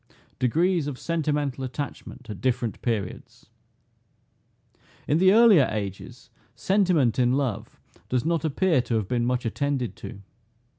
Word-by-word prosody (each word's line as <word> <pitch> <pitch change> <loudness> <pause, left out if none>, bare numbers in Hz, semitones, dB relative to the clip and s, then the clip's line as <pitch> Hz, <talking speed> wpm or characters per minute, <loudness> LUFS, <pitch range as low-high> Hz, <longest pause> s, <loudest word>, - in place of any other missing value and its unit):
DEGREES 165 +5 +1
OF 140 -3 -5
SENTIMENTAL 150 -5 -2
ATTACHMENT 130 -1 -6
AT 105 -4 -8
DIFFERENT 125 -5 -1
PERIODS. 105 -6 -4 1.6
In 150 - +2
the 185 +1 +6
earlier 215 - +6
ages, 100 -3 -6 0.2
sentiment 180 - +2
in 125 0 +3
love 130 -7 -3 0.3
does 125 +2 0
not 165 -2 0
appear 160 -1 +2
to 120 - -3
have 110 -4 -1
been 120 0 0
much 125 0 -1
attended 135 +1 -2
to. 100 0 -9
130 Hz, 130 wpm, -25 LUFS, 120-160 Hz, 1.6 s, the